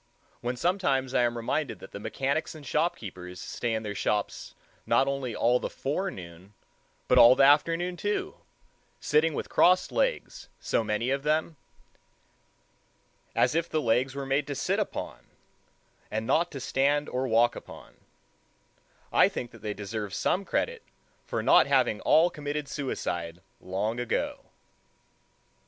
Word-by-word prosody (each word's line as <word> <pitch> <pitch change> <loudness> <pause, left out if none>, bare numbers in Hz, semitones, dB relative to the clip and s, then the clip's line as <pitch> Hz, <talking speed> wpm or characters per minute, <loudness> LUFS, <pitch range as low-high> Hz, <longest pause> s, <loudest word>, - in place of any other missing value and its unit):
When 120 +1 -3
sometimes 140 -6 0
I - - +3
am 120 -1 +1
reminded 115 0 -2
that 95 - -12
the - - -7
mechanics 140 +9 -2
and 150 -2 -11
shopkeepers 95 - -3
stay 115 +5 -3
in 110 - -3
their 105 -1 -4
shops 105 0 -2 0.3
not 135 - +3
only 135 -4 -2
all 125 +1 +3
the - - -4
forenoon, 100 - -5 0.5
but - - +5
all 120 +2 +9
the 135 - +4
afternoon 165 +5 +3
too, 205 +2 -2 0.6
sitting 155 +1 +2
with - - -3
crossed 185 +1 +3
legs, - - -1
so - - 0
many 110 +4 -1
of 135 0 0
them—as 155 0 -5
if 165 +1 0
the 155 - 0
legs 130 +1 +1
were 140 -1 -4
made 135 +1 0
to 140 - -4
sit - - 0
upon, - - -4 0.9
and 110 +1 -3
not 160 +7 +2
to 140 - -7
stand 145 +3 +1
or 130 +1 -2
walk 120 +1 +3
upon—I - - -5
think 120 - -6
that 115 - -15
they 105 -1 -4
deserve 105 -1 -5
some 195 +2 0
credit 480 - -1 0.5
for - - -2
not - - +6
having - - +2
all 170 +3 +4
committed 150 -1 -4
suicide 85 - -4 0.2
long 105 +5 -3
ago. 120 -1 -2
135 Hz, 145 wpm, -28 LUFS, 110-155 Hz, 0.9 s, all